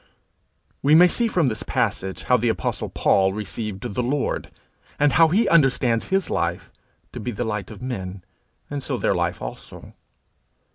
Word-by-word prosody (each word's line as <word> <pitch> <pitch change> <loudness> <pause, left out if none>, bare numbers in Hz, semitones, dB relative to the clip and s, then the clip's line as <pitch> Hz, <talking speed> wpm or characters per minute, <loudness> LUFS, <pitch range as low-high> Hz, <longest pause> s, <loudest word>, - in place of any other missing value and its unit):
We 145 +3 +5
may 175 +2 +8
see 235 +6 0
from 175 -9 +1
this 110 -3 -2
passage 95 0 -2
how 125 - +3
the 120 0 0
apostle 110 - -2
Paul 95 -1 +2
received 105 0 -5
the 125 - -1
Lord, 135 +3 -1 0.5
and 145 0 +3
how 165 +2 +6
he 200 +8 +2
understands 130 -7 +3
his 190 -1 +1
life 85 +1 -2 0.4
to - - -7
be 125 - -4
the 120 - -3
light 105 -4 -3
of 105 +1 -10
men, 95 -7 -5 0.4
and 145 -1 -4
so - - -3
their - - +1
life - - -2
also. - - -9
120 Hz, 170 wpm, -23 LUFS, 100-145 Hz, 0.5 s, may